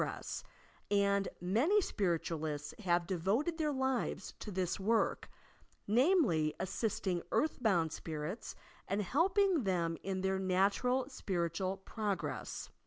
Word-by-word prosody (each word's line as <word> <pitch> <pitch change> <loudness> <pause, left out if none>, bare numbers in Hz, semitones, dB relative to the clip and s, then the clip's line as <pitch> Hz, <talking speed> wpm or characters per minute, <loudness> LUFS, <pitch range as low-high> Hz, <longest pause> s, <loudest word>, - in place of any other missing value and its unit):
s, - - -5 0.5
and 200 -1 +3
many 235 - +3
Spiritualists 160 - -1
have 175 -4 +2
devoted 200 - 0
their 305 -1 +1
lives 265 -7 -1
to - - -6
this 185 -2 -1
work 220 +4 +1 0.3
— - - -27 0.2
namely, 225 - +3
assisting 190 -3 -1
earthbouud 200 - +2
spirits 160 +8 -5 0.3
and 200 +2 0
helping 360 - +3
them 170 -4 0
in 190 0 -2
their 190 0 +1
natural 200 +7 +2
spiritual 190 - -2
progre.ss. 210 -3 -3
195 Hz, 110 wpm, -34 LUFS, 175-250 Hz, 0.5 s, and